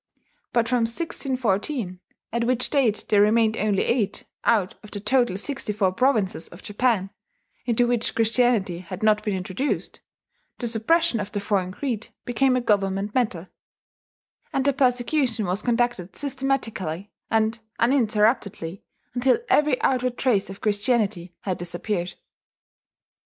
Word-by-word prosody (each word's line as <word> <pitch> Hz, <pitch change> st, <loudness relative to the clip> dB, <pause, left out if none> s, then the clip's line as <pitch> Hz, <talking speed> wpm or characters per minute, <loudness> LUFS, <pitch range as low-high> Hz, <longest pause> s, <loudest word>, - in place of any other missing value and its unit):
But 235 Hz, -1 st, +2 dB
from 240 Hz, -1 st, +2 dB
1614 240 Hz, -, -1 dB, 0.3 s
at 235 Hz, 0 st, 0 dB
which 250 Hz, 0 st, 0 dB
date 250 Hz, -8 st, +2 dB
there 205 Hz, -1 st, +5 dB
remained 220 Hz, +1 st, +4 dB
only 205 Hz, -3 st, +1 dB
eight, 215 Hz, -5 st, -1 dB, 0.2 s
out 205 Hz, -6 st, +2 dB
of 210 Hz, -, -12 dB
the 205 Hz, -, -5 dB
total 240 Hz, -1 st, +2 dB
sixty 270 Hz, 0 st, -2 dB
four 195 Hz, -2 st, +2 dB
provinces 215 Hz, -6 st, +1 dB
of 175 Hz, -, -14 dB
Japan, 205 Hz, -3 st, 0 dB, 0.6 s
into 240 Hz, 0 st, +3 dB
which 240 Hz, -1 st, 0 dB
Christianity 225 Hz, -5 st, +2 dB
had 185 Hz, +2 st, -8 dB
not 215 Hz, -1 st, +4 dB
been 205 Hz, -2 st, -1 dB
introduced 185 Hz, +9 st, -3 dB, 0.6 s
the 245 Hz, -, -4 dB
suppression 240 Hz, +5 st, +2 dB
of 205 Hz, -1 st, -4 dB
the 205 Hz, -, -2 dB
foreign 195 Hz, -2 st, 0 dB
creed 230 Hz, 0 st, -3 dB, 0.2 s
became 255 Hz, +2 st, +2 dB
a 255 Hz, -, +1 dB
government 200 Hz, -2 st, 0 dB
matter; 200 Hz, -8 st, -1 dB, 1.0 s
and 270 Hz, -, 0 dB
the 280 Hz, -, +3 dB
persecution 250 Hz, -3 st, +1 dB
was 185 Hz, +3 st, 0 dB
conducted 240 Hz, -6 st, 0 dB
systematically 245 Hz, -, -2 dB, 0.2 s
and 225 Hz, +1 st, +1 dB, 0.2 s
uninterruptedly 215 Hz, -7 st, +1 dB, 0.3 s
until 255 Hz, +1 st, +3 dB
every 295 Hz, -4 st, +3 dB
outward 255 Hz, -1 st, +1 dB
trace 220 Hz, -8 st, +1 dB
of 195 Hz, -, -9 dB
Christianity 205 Hz, -4 st, 0 dB
had 185 Hz, -3 st, -3 dB
disappeared. 175 Hz, +1 st, -2 dB
220 Hz, 135 wpm, -24 LUFS, 195-250 Hz, 1.0 s, there